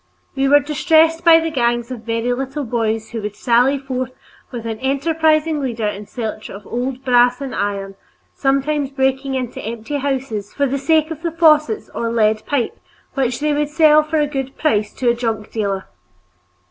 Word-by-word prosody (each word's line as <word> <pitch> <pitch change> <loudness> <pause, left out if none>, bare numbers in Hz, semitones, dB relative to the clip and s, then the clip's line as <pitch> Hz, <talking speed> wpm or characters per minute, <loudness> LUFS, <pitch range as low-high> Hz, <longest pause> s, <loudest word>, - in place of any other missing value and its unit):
We 270 0 +1
were 290 +1 +7
distressed 320 +2 +2
by 330 -1 +7
the 325 0 -2
gangs 240 -3 0
of 235 -3 -7
very 230 +1 -1
little 270 +3 -4
boys 225 -2 -2
who 230 -2 -4
would 210 0 -5
sally 250 +5 +3
forth 255 -2 -4 0.4
with 235 -3 -7
an 225 -1 -4
enterprising 310 +3 +1
leader 235 -5 -2
in 210 0 -4
search 220 -3 -5
of 200 +1 -10
old 255 +2 -4
brass 245 -1 +4
and 275 -2 -5
iron, 200 -1 -2 0.4
sometimes 275 +1 0
breaking 265 0 0
into 255 -3 -4
empty 230 +6 -4
houses 265 -7 -3
for 285 - +1
the 275 +1 -1
sake 315 +2 +2
of 320 -1 -6
the 335 -1 -2
faucets 320 +4 +3
or 230 0 -2
lead 215 -1 +2
pipe 275 -5 -1 0.3
which 255 -1 -1
they 300 0 +1
would 295 0 0
sell 305 -1 +5
for 305 +1 -2
a 300 - +3
good 270 -2 -5
price 215 -9 +1
to 255 - -3
a 235 - +5
junk 225 -3 -3
dealer. 200 -3 -2
265 Hz, 185 wpm, -19 LUFS, 230-295 Hz, 0.4 s, were